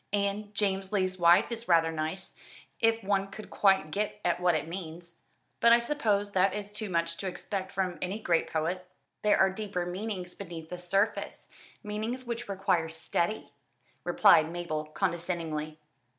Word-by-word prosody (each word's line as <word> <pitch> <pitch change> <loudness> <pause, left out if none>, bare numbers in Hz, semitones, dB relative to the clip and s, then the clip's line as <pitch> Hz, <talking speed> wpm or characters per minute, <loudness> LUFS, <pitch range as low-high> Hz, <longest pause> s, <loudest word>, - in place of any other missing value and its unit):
And 205 +1 0
'James 195 -1 0
Lee's 185 -2 0
Wife' 170 +6 +5
is 235 0 -5
rather 165 -2 +4
nice, 160 +4 -4 0.4
if 225 -1 +2
one 195 0 +1
could 210 +2 -10
quite 190 -6 +3
get 210 +3 -2
at 175 0 +2
what 180 -2 +3
it 155 0 -1
means. 170 -1 -7 0.4
But 235 - +6
I - - +8
suppose 220 -6 0
that 190 0 +3
is 205 0 -5
too 210 0 -4
much 170 -1 0
to 195 - -4
expect 190 +1 -4
from 185 -2 -2
any 185 +3 -2
great 170 -6 +1
poet?" 175 +3 -1 0.3
"There 210 -1 +4
are 190 0 +4
deeper 195 -3 -3
meanings 180 -1 -4
beneath 165 -4 -8
the 180 - -5
surface 195 +4 -1 0.3
meanings 220 +5 -3
which 235 -2 -4
require 185 -4 +1
study," 170 +5 -2 0.5
replied 160 +1 +5
Mabel 170 -3 -3
condescendingly. 165 -2 -2
190 Hz, 160 wpm, -29 LUFS, 170-205 Hz, 0.5 s, I